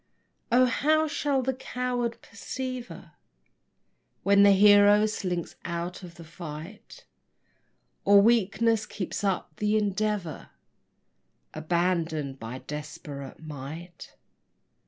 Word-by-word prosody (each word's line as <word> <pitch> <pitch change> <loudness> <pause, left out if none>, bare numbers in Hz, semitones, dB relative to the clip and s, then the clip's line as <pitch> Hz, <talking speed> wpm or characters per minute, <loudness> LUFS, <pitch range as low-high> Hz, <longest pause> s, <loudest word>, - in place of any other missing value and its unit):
O 250 +2 +6
how 310 +5 +2
shall 285 -3 0
the 265 +1 0
coward 250 -2 -3
persever 255 -2 -7 1.1
When 200 0 +5
the 200 0 +7
hero 205 +1 +6
slinks 180 -5 -3
out 170 +2 -4
of 175 -2 -11
the 170 - -11
fight; 165 +4 -10 1.0
Or 200 0 +7
weakness 225 0 +2
keep 185 - -5
up 185 -5 -2
the 210 +1 +1
endeavor 205 -4 -2 1.0
Abandoned 160 -4 -1
by 115 +3 -6
desperate 150 -1 -8
might? 155 +4 -9
195 Hz, 95 wpm, -27 LUFS, 165-225 Hz, 1.1 s, the